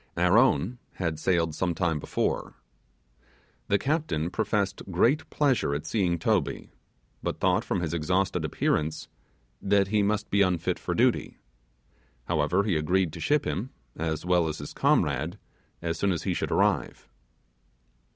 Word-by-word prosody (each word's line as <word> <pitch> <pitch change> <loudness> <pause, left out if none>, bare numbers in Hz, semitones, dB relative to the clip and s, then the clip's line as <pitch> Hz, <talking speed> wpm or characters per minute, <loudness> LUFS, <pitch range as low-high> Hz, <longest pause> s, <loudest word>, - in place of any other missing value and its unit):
Our - - +3
own 105 - +2
had 80 -4 -3
sailed 85 -2 +1
some 90 +1 -1
time 85 -4 0
before. - - -2 1.1
The 100 - +3
captain 130 - -1
professed 105 -3 -1
great 120 - +2
pleasure 130 - +1
at 75 +2 -4
seeing 90 -5 0
Toby, 95 -2 -1 0.5
but - - -3
thought - - +2
from 90 - -1
his 85 -2 -2
exhausted 90 +2 0
appearance 80 +1 -1 0.5
that 100 -1 +2
he 105 0 +2
must 105 +1 -1
be 100 - +3
unfit 90 -4 +1
for - - -3
duty. - - +1 0.9
However, 85 +4 +1
he 100 -4 0
agreed 90 +2 +1
to - - -7
ship 150 -1 +1
him, 120 +6 -2 0.3
as 80 0 -3
well 90 -2 +3
as 80 0 -3
his 75 - -8
comrade, 75 +7 +1 0.5
as 85 -1 -2
soon 100 - +2
as 85 -4 -2
he - - 0
should - - -2
arrive. - - 0
90 Hz, 150 wpm, -27 LUFS, 80-100 Hz, 1.1 s, Our